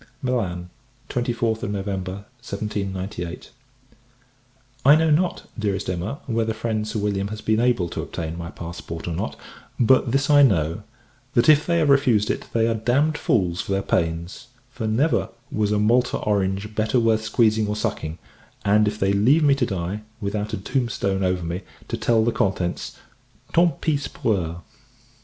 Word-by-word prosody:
Milan, 90 -9 -2 0.4
24th 120 -2 -1
November 100 -1 -4 0.2
1798. 100 -5 -4 1.3
I 140 +3 +8
know 160 0 +3
not, 175 +4 +1 0.2
Dearest 100 -2 -1
Emma, 90 +9 -3
whether 115 -2 -1
friend 110 -1 -2
Sir 110 +1 -3
William 100 -1 -1
has 105 +1 -6
been 110 0 +1
able 120 -7 +2
to - - -4
obtain 80 0 -5
my 85 0 -6
passport, 85 -1 -7
or 85 - -2
not; - - -3 0.4
but 125 +1 +4
this 135 +2 +2
I 145 -1 +6
know 85 - +3 0.5
that, 120 - +4
if 150 -1 +5
they 170 -1 +2
have 155 -3 +2
refused 125 -7 +4
it, - - -4
they 115 -1 +2
are 115 - +2
damned 130 +8 +1
fools 95 - +1
for 100 - -3
their 95 0 0
pains: 85 +6 -2 0.2
for, 115 -3 -4
never 130 +9 +1 0.2
was 105 -6 0
a 105 - +2
Malta 120 +4 +2
orange 100 0 -1
better 110 +3 +1
worth 115 -1 +2
squeezing 110 -1 +2
or 105 - -1
sucking; 80 -6 -3 0.5
and 105 +1 +4
if 105 0 -1
they 100 -2 +1
leave 130 +11 +4
me 145 -2 +5
to 135 -3 0
die, 95 +2 -3 0.2
without 105 +1 -3
a - - -2
tombstone 100 -3 -1
over 90 -1 0
me, 85 +3 -3 0.3
to - - -1
tell 115 -2 +2
the 120 - +2
contents 95 -4 -1 0.6
"tant 170 0 +3
pis 145 -3 0
pour 110 - 0
eux!" 85 -3 -3
105 Hz, 165 wpm, -23 LUFS, 95-120 Hz, 1.3 s, I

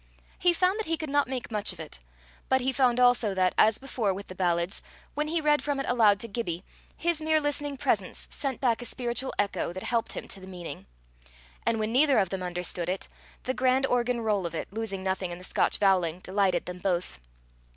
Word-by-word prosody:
He 355 - +5
found 365 +4 +2
that 440 - -2
he 330 0 0
could 310 -3 -5
not 285 -1 +3
make 255 -3 -4
much 210 -1 0
of 185 - -12
it. 155 - -8 0.5
But 260 0 +3
he 260 +2 +1
found 250 -2 +3
also 245 -5 +4
that, 185 -1 +2
as 220 0 +5
before 230 -7 -1
with 200 +1 -8
the - - -6
ballads, 175 +1 0 0.3
when 300 +1 -1
he 330 +2 +1
read 295 -1 +3
from 285 -2 -1
it 275 - -1
aloud 215 -5 +4
to 230 - -4
Gibbie, 195 -6 -3 0.3
his 340 -2 0
mere 315 0 +3
listening 290 -1 -2
presence - - 0
sent 275 -4 -2
back 245 -3 +1
a - - -6
spiritual 240 +1 -1
echo 200 -4 0
that 185 +2 -7
helped 235 -1 0
him - - -6
to 195 - -7
the 190 - -11
meaning; 175 - -8 0.8
and 230 - +3
when 215 0 -1
neither 280 +1 +5
of 195 -4 +3
them 190 0 -3
understood 180 -1 -2
it, 185 +1 -2 0.4
the 260 - -1
grand 260 +1 +2
organ 245 -1 +1
roll 205 -5 +1
of 165 - -7
it, 175 - -5
losing 210 -4 -3
nothing 190 -1 -1
in 175 - -6
the 180 - -12
Scotch - - +1
voweling, 185 -3 +2
delighted 190 -2 +1
them 180 0 -6
both. 180 - -1
225 Hz, 220 wpm, -28 LUFS, 185-265 Hz, 0.8 s, He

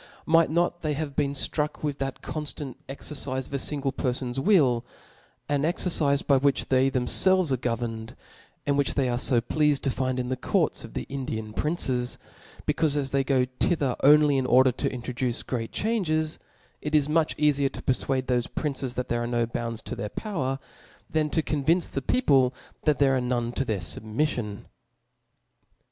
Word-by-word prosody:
Might 165 +1 +4
not 175 +2 0
they 155 -2 -1
have 145 -1 -4
been 140 -1 +1
flruck 150 +2 -1
with 145 -2 -2
that 135 -1 -4
conftant 150 -3 -4 0.2
exercife 135 -1 -3
of - - -11
a 140 - 0
fingle 140 -1 0
perfon's 125 0 -2
will, 135 - +4 0.6
an 145 -1 +1
exercife 155 -3 +1
by 140 - +4
which 140 +1 +1
they 130 0 +4
themfelves 160 +7 +3
are 130 - +2
governed, 115 -2 -3 0.5
and 140 0 +1
which 140 - +1
they 135 -2 +2
are 120 0 0
fo 125 -1 +2
pleafed 150 +3 +1
to 135 - 0
find 130 0 -1
in 125 0 -2
the 130 - 0
courts 130 - 0
of - - -11
the - - -2
Indian 110 -6 -4
princes; 130 -4 0 0.5
bec^ufe 150 -1 +2
as 135 -2 -2
they 140 0 +2
go 130 -1 +2
thither 145 -7 +1
only 145 -1 +6
in 130 - -1
order 130 +1 +5
to 135 +3 -2
introduce 125 -1 -3
great 115 -3 -3
changes, 160 -8 0 0.4
it 150 +1 -1
is 145 -2 +4
much 155 +1 +1
eafier 145 -2 +2
to - - -9
perfuade 130 0 0
thofe 125 -2 -1
princes 135 -4 -2
that 125 0 -2
there 120 0 -1
are 120 - -2
no 120 -1 +1
bounds 115 -1 -4
to - - -5
their 105 - -4
power, 135 - -3 0.5
than 155 -1 +1
to 160 +1 0
convince 155 +5 +1
the 135 - -3
people 135 - +3 0.3
that 150 -3 +3
there 135 -1 +4
are 130 - +1
none 120 -1 -1
to 130 - -1
their 110 -5 -1
fubmiOion 105 - -2 0.5
*. - - -50
135 Hz, 185 wpm, -26 LUFS, 125-150 Hz, 0.6 s, only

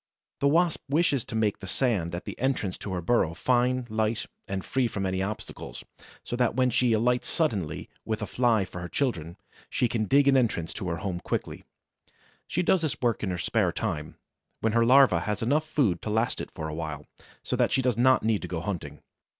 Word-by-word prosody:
The 140 - +3
Wasp 165 +3 +3
wishes 145 -4 +2
to 120 - -7
make 110 -2 +1
the 95 - -8
sand 95 -7 0
at 85 - -6
the - - -5
entrance 125 -8 0
to 100 - -6
her 90 -2 -3
burrow 85 -5 +2
fine, 125 +2 +1
light, 110 0 -1 0.2
and 95 -1 -3
free 130 -2 +1
from 100 -3 -3
any 95 0 -1
obstacle, 105 +2 -5 0.5
so - - -4
that 120 -2 +1
when 130 -1 +3
she 125 -1 +2
alights 125 +3 +2
suddenly 105 - -1 0.2
with 110 0 -2
a - - -1
Fly 115 -3 +2
for 90 -1 -8
her 85 - -6
children, 85 - -2 0.3
she 125 - +1
can 115 -2 -1
dig 140 +7 +4
an 140 - +6
entrance 105 -10 +1
to 100 -4 -5
her 85 - -2
home 90 -1 -3
quickly. - - -4 0.8
She 180 - 0
does 180 0 +3
this 155 -4 -2
work 120 -3 0
in 100 - -1
her 90 - -2
spare 85 - +1
time, 75 0 -3 0.4
when 110 -1 0
her 115 0 +4
larva 130 -9 +6
has 105 +6 -2
enough 150 +6 +1
food 120 - +1
to - - -4
last 110 +2 0
it - - -6
for 80 - -6
a 75 - -5
while, 75 -2 -5 0.4
so - - -1
that - - +2
she 130 - +2
does 125 -3 +2
not 130 +3 +4
need 110 -2 +1
to 90 - -5
go 85 -2 -3
hunting. 80 -6 -5
110 Hz, 215 wpm, -27 LUFS, 90-130 Hz, 0.8 s, an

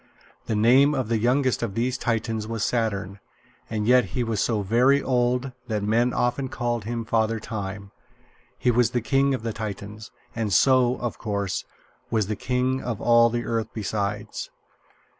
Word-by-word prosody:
The 110 - 0
name 130 +7 +5
of 125 -4 -2
the 115 -1 +1
youngest 130 +3 +1
of 110 -4 -3
these 125 +2 0
Titans 115 -3 -2
was 115 -2 -2
Saturn; 100 -5 -2 0.5
and 110 -2 -2
yet 125 +2 +5
he 125 - +2
was 110 -3 -1
so 110 -3 0
very 125 +7 +4
old 125 0 0 0.2
that 105 -3 -2
men 115 +4 +2
often 125 +2 -1
called 120 -3 -2
him 115 0 -3
Father 110 0 +1
Time. 100 -2 -6 0.7
He 125 - +2
was 120 0 +3
the - - 0
king 135 +3 +2
of 125 - -7
the 115 -1 -2
Titans, 105 +1 -6 0.3
and 110 -3 -2
so, 130 +3 +4
of 120 -1 -4
course, 100 -3 -2 0.4
was 110 -3 +1
the 105 +2 -3
king 125 +4 -1
of 115 -4 -4
all 120 0 +5
the 120 0 -3
earth 115 -1 -1
besides. 105 -1 -3
115 Hz, 170 wpm, -25 LUFS, 105-125 Hz, 0.7 s, name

